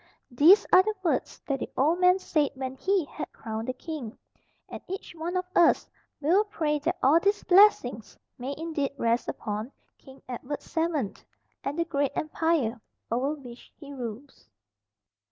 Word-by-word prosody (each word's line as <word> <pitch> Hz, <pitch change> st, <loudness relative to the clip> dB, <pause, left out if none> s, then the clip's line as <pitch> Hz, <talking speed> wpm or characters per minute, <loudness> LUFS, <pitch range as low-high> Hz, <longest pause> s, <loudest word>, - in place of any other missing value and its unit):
These 315 Hz, -, +6 dB
are 365 Hz, -, +9 dB
the 430 Hz, +2 st, -2 dB
words 340 Hz, -, -1 dB
that 275 Hz, -2 st, -1 dB
the -, -, -4 dB
old 315 Hz, +6 st, +3 dB
man 365 Hz, 0 st, +5 dB
said 305 Hz, -6 st, 0 dB
when 260 Hz, -1 st, -4 dB
he 380 Hz, +3 st, +1 dB
had -, -, -7 dB
crowned 220 Hz, 0 st, -6 dB
the 255 Hz, -, -1 dB
king, 255 Hz, -5 st, -7 dB, 0.5 s
and -, -, -8 dB
each 380 Hz, 0 st, -6 dB
one 340 Hz, +2 st, -3 dB
of 365 Hz, -, -1 dB
us 340 Hz, -1 st, +4 dB, 0.3 s
will 340 Hz, +8 st, +3 dB
pray 305 Hz, -7 st, -1 dB
that 335 Hz, +5 st, -1 dB
all 290 Hz, +5 st, +6 dB
these 405 Hz, +3 st, +1 dB
blessings 355 Hz, -, +4 dB, 0.2 s
may 265 Hz, +3 st, -4 dB
indeed 310 Hz, -4 st, -2 dB
rest 235 Hz, -1 st, +1 dB
upon 215 Hz, +3 st, -4 dB, 0.3 s
King 265 Hz, -1 st, -15 dB
Edward 255 Hz, +3 st, -5 dB
VII, 320 Hz, -, -1 dB, 0.5 s
and 280 Hz, +3 st, -3 dB
the 335 Hz, -, +1 dB
great 285 Hz, -4 st, -1 dB
Empire 305 Hz, -7 st, 0 dB, 0.3 s
over 265 Hz, +6 st, 0 dB
which 245 Hz, -4 st, -13 dB
he 285 Hz, -2 st, -10 dB
rules. 245 Hz, -, -8 dB
290 Hz, 160 wpm, -27 LUFS, 255-335 Hz, 0.5 s, are